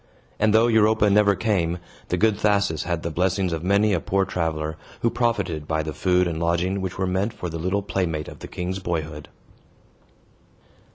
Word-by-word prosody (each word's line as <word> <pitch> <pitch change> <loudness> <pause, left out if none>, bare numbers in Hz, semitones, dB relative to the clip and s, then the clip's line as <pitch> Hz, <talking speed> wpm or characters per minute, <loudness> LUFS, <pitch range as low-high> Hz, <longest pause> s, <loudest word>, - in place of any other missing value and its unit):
And, 110 0 +3
though 110 +2 +5
Europa 110 -2 +4
never 100 0 +4
came, 90 -6 0 0.3
the 90 - -1
good 110 +3 +3
Thasus 100 -7 +1
had 85 -1 -2
the 85 - -2
blessings 90 +1 0
of 80 0 -3
many 100 +3 +3
a 90 - +2
poor 95 +3 0
traveler, 80 -4 -2 0.3
who 115 - +2
profited 95 -11 -1
by 80 -1 0
the 80 0 -4
food 90 -1 +2
and 80 -2 -3
lodging 85 +3 0
which 95 -1 -4
were 95 - 0
meant 95 +4 -1
for 90 - -5
the 80 0 -5
little 95 +4 -1
playmate 85 -6 -2
of - - -10
the - - -8
king's 90 +2 -4
boyhood. 80 -4 -4
90 Hz, 185 wpm, -24 LUFS, 85-100 Hz, 0.3 s, though